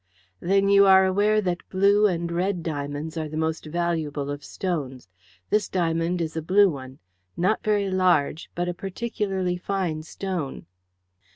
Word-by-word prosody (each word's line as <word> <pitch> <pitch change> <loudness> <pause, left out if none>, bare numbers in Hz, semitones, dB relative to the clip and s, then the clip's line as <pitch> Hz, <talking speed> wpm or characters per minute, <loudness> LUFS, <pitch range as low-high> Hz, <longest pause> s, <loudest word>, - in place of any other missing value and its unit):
"Then 195 +2 +2
you 200 0 +6
are 190 0 +7
aware 205 +3 +2
that 180 -3 -3
blue 200 +2 +4
and 170 -2 -2
red 180 0 -1
diamonds 145 +1 -4
are 155 -1 -3
the 155 - -5
most 160 0 -2
valuable 155 -4 -2
of 145 0 -6
stones. 145 - -4 0.4
This 210 - +2
diamond 170 0 0
is 160 -1 -3
a 160 - -2
blue 195 +4 +4
one 130 -2 -9 0.4
not 185 +5 +1
very 205 -2 +1
large, 175 -4 +1
but 175 0 -1
a 175 - -1
particularly 190 -1 -3
fine 180 -4 -2
stone." 165 -3 -5
175 Hz, 155 wpm, -25 LUFS, 160-195 Hz, 0.4 s, are